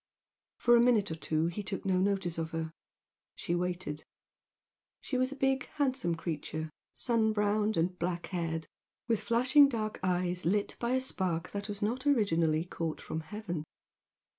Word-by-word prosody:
For 240 0 +5
a 235 - +6
minute 230 -6 +3
or - - -2
two 155 0 0
he 175 +5 -2
took 195 -1 -5
no 185 -1 +2
notice 190 -3 0
of 160 -1 -2
her. 160 0 -4 0.6
She 170 - -3
waited. 175 -3 -2 1.0
She 265 - -4
was 255 +1 +2
a - - -5
big 270 -1 +1
handsome 260 - +1
creature, 160 -1 -4 0.2
sun 225 -2 +2
browned 210 0 +1
and 180 +2 0
black 175 0 -1
haired, 165 -2 -1 0.4
with 225 -3 +1
flashing 255 +5 +5
dark 215 -4 -3
eyes 180 -1 0
lit 200 +5 +1
by 240 +1 0
a 260 - +2
spark 180 -9 -1
that 200 +1 -4
was 205 0 -4
not 250 +6 -1
originally 165 - +3
caught 165 -2 -3
from 160 - -4
heaven. 175 -1 -5
190 Hz, 165 wpm, -31 LUFS, 165-230 Hz, 1.0 s, a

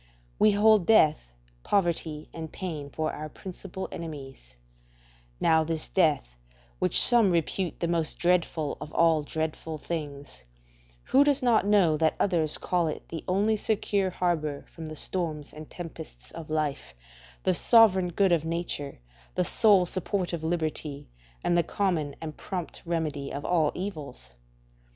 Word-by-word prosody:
We 215 -1 +5
hold 210 -2 +4
death, 155 - +4 0.3
poverty, 165 - -1
and 160 -1 -7
pain 155 -6 -5
for 155 +2 -2
our 155 0 -6
principal 190 +2 -7
enemies; 135 - -8 0.8
now, 160 -1 +4
this 160 0 -4
death, 155 - +2 0.5
which - - +2
some 235 -5 +6
repute 175 +1 -1
the 170 - -1
most 165 -2 -1
dreadful 175 -4 0
of 150 - -7
all 165 -2 +4
dreadful 160 +1 -4
things, 145 - -6 0.6
who 275 - +4
does 285 -2 +2
not 225 -4 +3
know 190 -7 +4
that 160 0 +2
others 165 -6 +1
call 175 -2 0
it 155 - -6
the 165 - -6
only 205 +4 +2
secure 205 -2 0
harbour 160 -5 -1
from 160 -1 -8
the 155 - -7
storms 155 -3 -2
and 155 0 -10
tempests 165 -2 -9
of 165 -2 -9
life, 155 - -2 0.5
the 185 - +3
sovereign 190 -2 +5
good 190 +2 +2
of 165 -3 +3
nature, 165 -4 -3 0.4
the 180 - +1
sole 200 -4 +4
support 185 0 -2
of 165 -2 -3
liberty, 155 - -3 0.3
and 175 - +2
the 170 - +5
common 165 -7 -1
and 155 -1 -7
prompt 180 -4 -5
remedy 155 -5 -2
of 140 - -5
all 160 -4 +2
evils? 150 - -6
165 Hz, 145 wpm, -27 LUFS, 155-185 Hz, 0.8 s, some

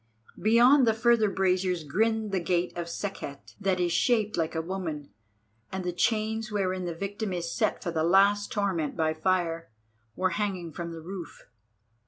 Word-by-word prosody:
Beyond 240 +5 +6
the 225 - +3
further 235 -2 +3
braziers 185 -2 +1
grinned 220 +7 0
the 190 - +1
gate 175 0 -1
of 170 -1 -4
Sekhet, 170 -6 -6
that 195 -2 0
is 175 -1 +1
shaped 215 +3 +2
like 165 -1 -1
a 160 - 0
woman, 165 - -5 0.6
and 190 0 -3
the 180 0 -2
chains 220 +3 0
wherein 185 -3 -1
the 170 -1 -3
victim 200 +3 -4
is 170 -1 -3
set - - 0
for 170 - -2
the 160 -1 0
last 200 +4 +4
torment 190 -8 -1
by 160 -1 +1
fire, 165 0 -1 0.5
were 185 0 +1
hanging 190 -5 -2
from 170 +2 -6
the 165 -1 -8
roof. 175 0 -8
185 Hz, 170 wpm, -28 LUFS, 170-205 Hz, 0.6 s, Beyond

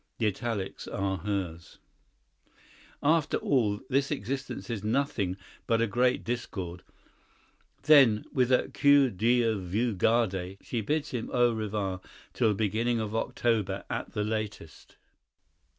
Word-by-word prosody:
(The 115 - 0
italics 105 -1 -3
are 95 0 -2
hers.) 95 -5 -4 1.3
"After 155 +1 +2
all, 110 -7 +1
this 140 +1 +1
existence 135 0 -4
is 110 -4 -4
nothing 110 -6 0 0.3
but 115 -1 +2
a 115 - +3
great 125 +4 +1
discord." 95 -7 -4 1.0
Then, 135 -8 +6
with 125 -1 +2
a 125 - +3
"que 140 -2 +4
Dieu 115 +1 +2
vous 105 +6 -1
garde," 95 -3 +1
she 120 - -3
bids 150 +7 -1
him 120 -3 -4
au 120 -1 +3
revoir 105 -4 -3 0.3
till 110 - +2
the 105 - +1
beginning 115 +3 0
of 110 0 -3
October 110 -4 0
at - - -4
the 105 - -1
latest. 105 -6 -5
110 Hz, 130 wpm, -28 LUFS, 100-125 Hz, 1.3 s, Then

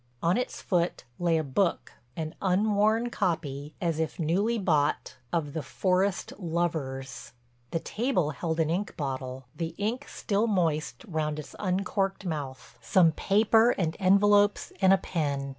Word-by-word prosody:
On 170 +2 +3
its 250 +2 -3
foot 175 -2 0 0.2
lay 170 -2 +2
a 160 - 0
book, 170 +6 0 0.2
an 155 -1 -4
unworn 210 +4 +2
copy, 155 -8 -2
as 165 -3 -1
if 160 -1 -2
newly 195 +8 +1
bought, 155 -8 0
of 155 -5 -1
"The 160 - -2
Forest 185 +7 0
Lovers." 155 - -3 0.4
The 165 - -2
table 210 - 0
held 160 +3 -3
an 160 -1 +2
ink 195 +4 -2
bottle, 130 -3 -4
the 165 -1 -4
ink 230 +7 -2
still 210 +1 -1
moist 170 -1 0
round 155 -4 -2
its 150 - -8
uncorked 195 0 -1
mouth, 140 -6 -5
some 175 -4 +4
paper 220 +7 +3
and 165 -4 0
envelopes 205 +2 +4
and 190 0 +6
a 195 - +7
pen. 140 -7 -2
170 Hz, 145 wpm, -28 LUFS, 155-200 Hz, 0.4 s, a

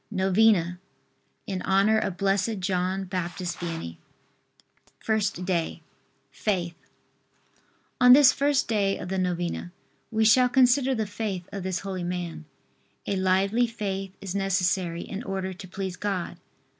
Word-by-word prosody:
NOVENA 190 -3 +2 0.7
IN 190 -2 -4
HONOR 200 +3 +3
OF 195 -4 -3
BLESSED 200 +2 0
JOHN 185 +1 -1
BAPTIST 180 -1 -4
VIANNEY. 165 - -5 1.0
FIRST 210 -5 -1
DAY. 170 -3 -2 0.5
FAITH. 175 -1 -2 1.3
On 250 0 +9
this 275 -1 +7
first 285 0 +1
day 200 -3 +1
of 180 - -7
the 190 0 -1
novena 175 -1 -2 0.4
we 220 -1 +1
shall 250 +3 +5
consider 260 +1 +4
the 220 -2 -1
faith 200 -3 -4
of 200 - -5
this 185 -1 -2
holy 190 -2 -4
man. 175 -2 -4 0.6
A 200 - -1
lively 195 +5 +2
faith 195 -4 -4
is 195 -2 -5
necessary 185 -3 0
in 200 - -6
order 190 -3 -4
to 185 +1 -10
please 190 0 -5
God. 195 -4 -3
190 Hz, 130 wpm, -26 LUFS, 180-215 Hz, 1.3 s, On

